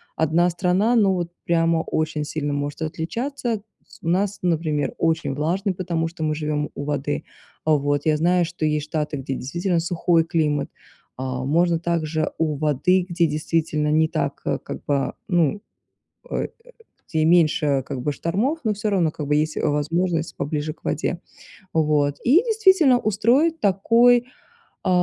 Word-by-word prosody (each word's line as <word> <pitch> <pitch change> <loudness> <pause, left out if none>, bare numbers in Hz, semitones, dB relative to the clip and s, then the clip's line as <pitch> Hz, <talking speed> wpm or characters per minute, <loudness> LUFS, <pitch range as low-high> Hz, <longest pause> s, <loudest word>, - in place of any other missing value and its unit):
одна 165 +3 +2
страна, 190 +7 +1
но 200 -4 +4
вот 175 -2 -3
прямо 165 -1 +2
очень 155 -1 -2
сильно 145 -1 -3
может 145 +2 -3
отличаться. 230 - -3 0.2
С - - -18
у - - -7
нас, 195 +3 +1
например, 160 -4 0
очень 160 -3 0
влажный, 180 +7 -1
потому 170 -3 -2
что 165 -1 -6
мы 155 0 0
живем 150 -1 -2
у 140 - -5
воды. 145 0 -2 0.4
Вот 145 -2 +1
я 155 -1 +3
знаю, 175 +2 +2
что 170 -2 -4
есть 150 -1 0
штаты, 150 -1 -2
где 135 0 -4
действительно 170 +7 -1
сухой 165 0 +2
климат. 155 -3 0 0.5
А, 130 -1 -3
можно 170 +3 +2
также 160 -2 -1
у 155 -2 +1
воды, 155 +5 +2
где 170 -1 +2
действительно 155 0 -1
не 160 +1 +3
так, - - -3
как - - -4
бы, 140 -2 0
ну, 175 0 +1 0.7
э, - - -2 0.6
где 160 -2 +1
меньше, 155 -5 +3
как 130 - -4
бы, 145 +2 0
штормов, 220 - -1
но 215 - +2
всё 210 +1 -2
равно 175 -6 +2
как 150 -1 -6
бы 150 - +1
есть 155 +1 0
возможность 160 +3 0
поближе 150 +1 -2
к - - -36
воде. 175 - -2 0.5
Вот. 150 -3 +2
И, 285 +9 +5
действительно, 380 - +4
устроить 245 - +2
такой, 235 +5 +4 0.6
э, - - +1
165 Hz, 155 wpm, -23 LUFS, 150-185 Hz, 0.7 s, И